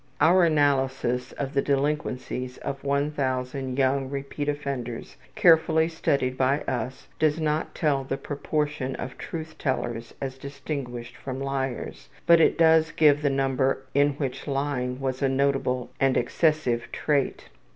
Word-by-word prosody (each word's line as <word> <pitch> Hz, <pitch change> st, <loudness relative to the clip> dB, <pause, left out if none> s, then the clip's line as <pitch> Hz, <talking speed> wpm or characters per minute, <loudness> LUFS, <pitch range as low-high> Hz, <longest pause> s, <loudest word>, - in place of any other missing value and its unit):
Our 175 Hz, +2 st, +5 dB
analysis 135 Hz, -5 st, +1 dB
of 140 Hz, -1 st, -4 dB
the 140 Hz, -, +3 dB
delinquencies 135 Hz, -3 st, -2 dB
of 135 Hz, 0 st, -5 dB
1000 135 Hz, -2 st, -1 dB
young 135 Hz, 0 st, +1 dB
repeated 145 Hz, +1 st, -3 dB
offenders 125 Hz, -5 st, -5 dB, 0.2 s
carefully 160 Hz, -1 st, +5 dB
studied 140 Hz, -5 st, 0 dB
by 135 Hz, +3 st, +2 dB
us 125 Hz, 0 st, -4 dB
does 155 Hz, 0 st, +2 dB
not 155 Hz, 0 st, -1 dB
tell 145 Hz, -4 st, +1 dB
the 135 Hz, 0 st, -3 dB
proportion 145 Hz, -2 st, -2 dB
of 130 Hz, -, -6 dB
truth 160 Hz, -1 st, -7 dB
tellers 120 Hz, -4 st, -2 dB
as 135 Hz, -1 st, -5 dB
distinguished 130 Hz, -3 st, -6 dB
from 130 Hz, -1 st, -6 dB
liars, 135 Hz, -1 st, -4 dB, 0.2 s
but 170 Hz, -1 st, +7 dB
it -, -, +4 dB
does 160 Hz, -1 st, +5 dB
give 150 Hz, -2 st, +4 dB
the 145 Hz, -, +2 dB
number 135 Hz, 0 st, +1 dB
in 145 Hz, +1 st, +3 dB
which 135 Hz, -1 st, -4 dB
lying 135 Hz, -2 st, -1 dB
was 130 Hz, -1 st, -2 dB
a 135 Hz, -, +3 dB
notable 135 Hz, -2 st, 0 dB
and 135 Hz, -1 st, +3 dB
excessive 130 Hz, -2 st, +1 dB
trait. 145 Hz, -3 st, -1 dB
140 Hz, 140 wpm, -26 LUFS, 130-150 Hz, 0.2 s, but